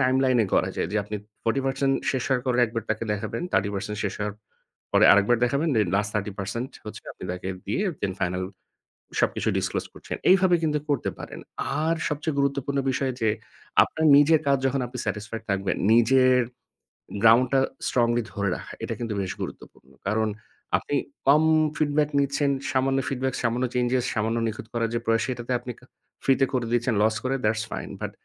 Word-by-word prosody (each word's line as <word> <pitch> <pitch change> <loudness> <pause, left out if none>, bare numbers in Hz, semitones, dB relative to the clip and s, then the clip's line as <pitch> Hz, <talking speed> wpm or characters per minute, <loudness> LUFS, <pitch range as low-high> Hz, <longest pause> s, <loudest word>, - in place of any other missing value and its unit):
টাইমলাইনে 130 -3 +3
করা - - +2
যায় - - -1
যে - - 0
আপনি 105 +1 -4 0.3
40% 135 +2 +1 0.2
শেষ 130 -3 -1
হওয়ার 130 -2 +1
পরে 125 -1 +1
একবার 115 -1 -4
তাকে 110 +1 -1
দেখাবেন, 105 +10 -3
30% 100 +1 -1
শেষ 100 - -2
হওয়ার 105 -1 -3 0.6
পরে - - +5
আরেকবার 105 +4 +4
দেখাবেন 140 +6 +1
দেন 105 -4 +2
লাস্ট 105 0 0
30% 105 +5 -3
হচ্ছে 105 - -8
আপনি - - -10
তাকে 90 +1 -5 0.2
দিয়ে 200 - 0 0.2
দেন 95 -2 0
ফাইনাল 90 +1 -1 0.8
সবকিছু - - +1
ডিসক্লোস - - -1
করছেন। - - -6 0.2
এইভাবে 185 -2 +5
কিন্তু 150 -1 +1
করতে 145 -3 0
পারেন। - - -8 0.4
আর 165 +1 +2
সবচেয়ে 150 0 -2
গুরুত্বপূর্ণ 140 0 0
বিষয় 130 0 0
যে 110 - +3 0.5
আপনার 160 0 -2
নিজের 155 +2 +5
কাজ 140 0 +4
যখন 135 0 0
আপনি - - -8
স্যাটিস্ফাইড 110 +1 -4
থাকবেন, 100 0 0 0.2
নিজের 130 +2 +5 0.8
গ্রাউন্ডটা 125 +4 +6 0.3
স্ট্রংলি 120 -1 +2
ধরে 100 -1 0
রাখা - - -10
এটা - - -2
কিন্তু 115 -2 -3
বেশ 95 - -3
গুরুত্বপূর্ণ। 65 - -9 0.2
কারণ 110 +1 +1 0.5
আপনি 145 - -3 0.3
কম 150 +3 +6 0.3
ফিডব্যাক 150 -1 +1
নিচ্ছেন, 140 0 +1 0.2
সামান্য 135 +1 +2
ফিডব্যাক, 130 0 -1
সামান্য 120 +2 +1
চেঞ্জেস, 125 0 +1
সামান্য 110 +1 0
নিখুঁত 110 0 -5
করার 115 -1 0
যে - - +1
প্রয়াস 115 0 +2
সেটাতে 125 -1 -4
আপনি 125 0 -6
কা 125 - -19 0.4
ফ্রিতে 135 0 +4
করে 125 -2 0
দিচ্ছেন 120 -1 +1
লস 110 0 +2
করে 130 +1 0
দ্যাটস 110 +1 +1
ফাইন, - - -5
বাট - - -3
125 Hz, 170 wpm, -25 LUFS, 110-135 Hz, 0.8 s, গ্রাউন্ডটা